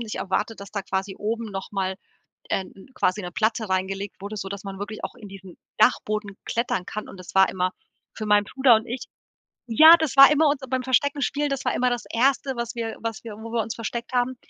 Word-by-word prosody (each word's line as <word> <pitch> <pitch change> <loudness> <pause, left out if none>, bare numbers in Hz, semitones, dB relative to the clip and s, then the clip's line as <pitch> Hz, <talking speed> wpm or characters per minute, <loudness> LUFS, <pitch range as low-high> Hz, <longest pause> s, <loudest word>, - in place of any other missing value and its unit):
nicht 225 -2 -5
erwartet, 210 +3 -2
dass 200 - -9
da 200 -2 -3
quasi 190 +1 -3
oben 225 +2 -3
noch 195 -1 -6
mal, 190 -1 -1 0.6
äh, 190 - 0
'n 195 +5 -15
quasi 200 -1 0
'ne 180 - -5
Platte 220 +3 0
reingelegt 195 +2 -2
wurde, 205 +2 -6
sodass 195 0 -5
man 195 -1 -7
wirklich 210 +1 -6
auch - - -6
in 210 - -12
diesen 190 -2 -12 0.2
Dachboden 215 -3 +1
klettern 225 -6 -1
kann 215 +2 -6
und - - -10
das 185 +1 -11
war 190 0 +6
immer 185 0 -1 0.4
für 215 - -6
meinen 205 0 +4
Bruder 265 +1 +4
und 220 - +1
ich 245 +2 -5 0.6
ja, 315 +8 +9
das 315 -5 -1
war 275 +1 +10
immer 300 +1 +4
uns 285 -1 -1
beim 260 0 -1
Versteckenspielen, 285 +2 +1
das 275 -1 -3
war 250 - 0
immer 250 0 +2
das 245 -1 -1
1., 270 +3 +2
was 235 0 -4
wir 225 -1 -4
was 230 0 -4
wir 220 - -7
wo 225 +1 -9
wir 230 - +1
uns 220 +1 -5
versteckt 235 +2 -5
haben, 250 0 0
220 Hz, 225 wpm, -24 LUFS, 195-250 Hz, 0.6 s, war